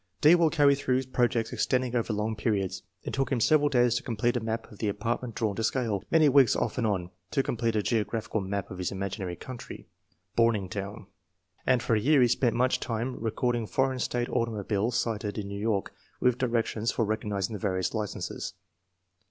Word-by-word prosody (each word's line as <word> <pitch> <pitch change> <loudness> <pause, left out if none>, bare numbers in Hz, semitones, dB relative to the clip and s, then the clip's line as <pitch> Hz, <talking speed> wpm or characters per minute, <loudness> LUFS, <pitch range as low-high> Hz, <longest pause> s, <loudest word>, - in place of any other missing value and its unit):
"D. 155 +3 +8
will 170 -2 +5
carry 145 -3 +5
through 130 -2 0
projects 120 -3 0
extending 125 -1 0
over 115 -1 0
long 110 +1 -1
periods. 105 -3 -1 0.2
It - - -5
took 135 0 0
him 130 - +1
several 145 +5 +4
days 120 -4 +3
to - - -3
complete 120 +1 0
a - - +2
map 115 0 -4
of 105 - -14
the 110 - -1
apartment 115 +3 -3
drawn 110 -4 -1
to 115 - -1
scale; 115 -5 0
many 160 -2 +5
weeks 135 -3 +5
off 120 0 -1
and 115 - +1
on, 90 -4 -1 0.2
to 135 +9 +1
complete 115 -2 -1
a 105 - +1
geographical 110 -1 -1
map 100 +1 -3
of 95 - -7
his 90 - -1
imaginary 95 -2 -4
country, 125 +6 -9 0.3
' 90 +4 -43
Borningtown/ 105 -2 0 0.6
and 125 -2 +3
for - - +1
a 110 - +4
year 140 +6 +4
he - - +5
spent 120 0 +1
much 125 +2 +2
time 120 +2 -2
recording 120 0 -1
foreign 130 +1 0
state 120 -1 -1
automobiles 110 0 0
sighted 105 -2 -2
in 100 -2 -3
New 100 0 -5
York, 105 -3 -1 0.3
with 125 0 +2
directions 115 -2 0
for 115 - 0
recognizing 105 -1 -2
the 105 - -4
various 95 -2 -1
licenses. 110 -2 -4
115 Hz, 195 wpm, -28 LUFS, 105-125 Hz, 0.6 s, D